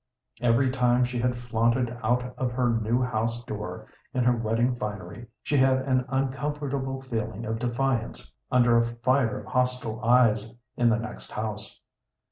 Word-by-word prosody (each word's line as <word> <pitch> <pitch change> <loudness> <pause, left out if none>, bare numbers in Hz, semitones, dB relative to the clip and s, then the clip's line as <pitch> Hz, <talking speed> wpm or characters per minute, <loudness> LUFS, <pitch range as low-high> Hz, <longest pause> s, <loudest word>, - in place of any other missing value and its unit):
Every 120 +2 +3
time 125 -1 +3
she 125 0 -3
had 125 0 0
flaunted 120 +1 0
out 125 +2 0
of 125 -2 -1
her 125 -1 +2
new 115 +2 +1
house 115 -1 -1
door 105 -2 -6 0.3
in 125 - +2
her 125 0 +4
wedding 115 +2 +1
finery 105 0 -6 0.2
she 145 - +1
had 130 0 +4
an 130 -2 +1
uncomfortable 135 0 -2
feeling 115 -4 -4
of 110 0 -2
defiance 120 - -2 0.2
under 120 -2 +5
a 115 0 -1
fire 125 -1 +1
of - - -13
hostile 125 -3 -1
eyes 115 -2 +3 0.2
in 120 -1 +3
the 115 - +3
next 115 +2 -7
house. 105 -1 -5
120 Hz, 155 wpm, -27 LUFS, 115-130 Hz, 0.3 s, under